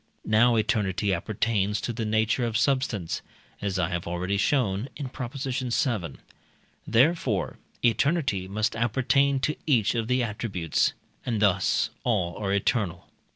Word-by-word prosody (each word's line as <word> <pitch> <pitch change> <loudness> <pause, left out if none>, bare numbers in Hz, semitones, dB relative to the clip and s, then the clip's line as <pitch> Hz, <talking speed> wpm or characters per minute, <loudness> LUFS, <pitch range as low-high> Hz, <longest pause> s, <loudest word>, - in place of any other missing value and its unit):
Now 115 +3 +4
eternity 105 -3 +1
appertains 105 +2 0
to 120 - -3
the 115 0 -3
nature 110 +3 +1
of 115 -2 0
substance 115 - 0 0.4
(as 100 -2 -1
I 90 -2 +1
have 85 -2 -3
already 90 +3 -1
shown 105 0 +1
in 140 -3 -5
Prop. 125 -1 -6
vii.); 125 - -1 0.7
therefore, 125 - +2 0.3
eternity 120 - +1
must 105 +3 -1
appertain 130 +4 +2
to 150 - 0
each 115 -8 +3
of 115 -2 -1
the 125 0 +2
attributes, 100 -7 -1 0.3
and 115 -4 -1
thus 100 +2 +2
all 95 -8 0
are 100 -2 -2
eternal. 100 -3 0
110 Hz, 135 wpm, -26 LUFS, 100-125 Hz, 0.7 s, Now